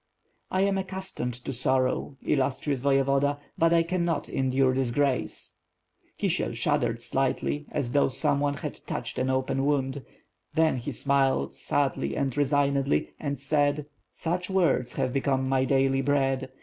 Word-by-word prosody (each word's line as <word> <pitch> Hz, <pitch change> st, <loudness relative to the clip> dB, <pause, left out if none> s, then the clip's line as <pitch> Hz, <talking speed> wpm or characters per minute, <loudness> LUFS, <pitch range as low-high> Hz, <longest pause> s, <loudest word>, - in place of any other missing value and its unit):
"I 185 Hz, -, +1 dB
am 195 Hz, 0 st, +2 dB
accustomed 190 Hz, -10 st, -4 dB
to 135 Hz, -, -3 dB
sorrow, 130 Hz, +2 st, 0 dB
illustrious 135 Hz, -1 st, 0 dB
Voyevoda, 140 Hz, +1 st, +2 dB, 0.2 s
but 165 Hz, 0 st, +3 dB
I 170 Hz, 0 st, +4 dB
cannot 170 Hz, -1 st, -1 dB
endure 130 Hz, 0 st, +1 dB
disgrace." 130 Hz, +1 st, -1 dB, 0.6 s
Kisiel -, -, 0 dB
shuddered 115 Hz, -1 st, 0 dB
slightly, 135 Hz, +4 st, -1 dB
as 135 Hz, -5 st, -2 dB
though 140 Hz, -, +3 dB
someone 140 Hz, +2 st, +1 dB
had -, -, -6 dB
touched -, -, -4 dB
an 130 Hz, +1 st, 0 dB
open 130 Hz, +1 st, 0 dB
wound; 140 Hz, -1 st, 0 dB, 0.5 s
then 160 Hz, -4 st, +3 dB
he 120 Hz, -, -4 dB
smiled, 135 Hz, -, +1 dB
sadly 140 Hz, -2 st, -1 dB
and 135 Hz, -3 st, -1 dB
resignedly, 140 Hz, -1 st, +1 dB
and 140 Hz, -3 st, -3 dB
said: 145 Hz, +1 st, +1 dB, 0.3 s
"Such 180 Hz, +2 st, -2 dB
words 170 Hz, -10 st, +2 dB
have 125 Hz, -, -1 dB
become 135 Hz, -1 st, +1 dB
my 130 Hz, 0 st, +2 dB
daily 135 Hz, 0 st, +2 dB
bread. 135 Hz, -1 st, +1 dB
140 Hz, 135 wpm, -27 LUFS, 130-145 Hz, 0.6 s, I